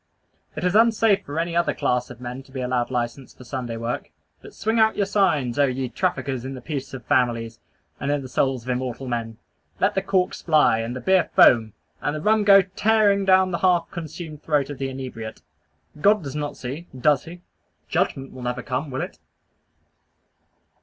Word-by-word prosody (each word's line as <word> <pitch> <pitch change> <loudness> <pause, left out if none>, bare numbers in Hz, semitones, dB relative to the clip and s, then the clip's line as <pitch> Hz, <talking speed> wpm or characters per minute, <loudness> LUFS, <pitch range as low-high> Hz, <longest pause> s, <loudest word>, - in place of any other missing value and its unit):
It 150 - -5
is 180 0 +1
unsafe 225 -2 +4
for 145 +3 -4
any 170 0 -2
other 170 0 +1
class 125 0 0
of 125 -2 -11
men 125 +1 -6
to 135 - -20
be 130 - -6
allowed 125 -1 -1
license 125 +1 -4
for - - -13
Sunday 120 -2 -5
work. 115 +1 -4 0.3
But - - -13
swing 220 +2 0
out 220 0 +4
your 200 - +2
signs, 160 - +1
oh 140 - +5
ye 130 0 -2
traffickers 130 +2 -2
in 135 +1 -5
the - - -7
peace 135 -1 -5
of 130 - -10
families, 120 -4 0 0.4
and 140 - -3
in 145 -1 0
the - - -7
souls 130 -1 0
of 130 - -9
immortal 125 +1 -3
men! 115 -2 -3 0.4
Let 200 +2 +2
the 195 - 0
corks 190 -1 0
fly, 150 -8 +4
and 115 +2 -3
the 130 - -5
beer 190 -1 +3
foam, 115 - +6 0.3
and 145 - -1
the - - -3
rum 215 +3 +3
go 195 -1 +7
tearing 200 +1 +2
down 190 -1 +4
the 170 - -2
half 180 -2 +2
consumed 160 -2 -7
throat 150 -2 0
of 145 - -8
the 135 -1 -2
inebriate. 125 -4 -7 0.6
God 205 +1 +4
does 140 -1 -6
not 150 -1 -4
see, 140 +7 -6
does 145 0 +3
he? 175 +1 -10 0.5
Judgment 135 0 -1
will 130 - -9
never 125 0 -3
come, 135 +4 -3
will 130 0 -3
it? - - -6
140 Hz, 200 wpm, -23 LUFS, 125-180 Hz, 0.6 s, go